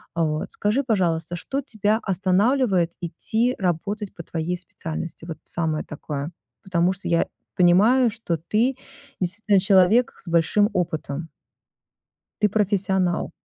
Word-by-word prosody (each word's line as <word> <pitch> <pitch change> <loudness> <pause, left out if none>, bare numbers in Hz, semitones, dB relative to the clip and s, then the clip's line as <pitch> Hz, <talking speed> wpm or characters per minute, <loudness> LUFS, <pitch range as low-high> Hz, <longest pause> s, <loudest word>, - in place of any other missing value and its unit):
Э, 170 - 0
вот. 155 0 -2
Скажи, 215 +7 0
пожалуйста, 175 -7 0
что 270 - -3
тебя 215 -3 0
останавливает 190 -1 +2
идти 220 +9 0
работать 195 +3 -2
по - - -7
твоей 170 +3 -3
специальности? 165 -2 -6
Вот 165 -2 -6
самое 160 -3 -1
такое. 145 0 -5 0.3
Потому 180 0 +1
что 190 - -8
я 170 -1 +2 0.3
понимаю, 215 +8 +5
что 205 -7 -3
ты 220 - +1 0.4
действительно 195 +2 +2
человек 195 +5 +4
с - - -17
большим 170 +5 +3
опытом. 160 -2 -2 1.1
Ты 210 - +4
профессионал. 190 -3 +1
185 Hz, 125 wpm, -23 LUFS, 170-210 Hz, 1.1 s, понимаю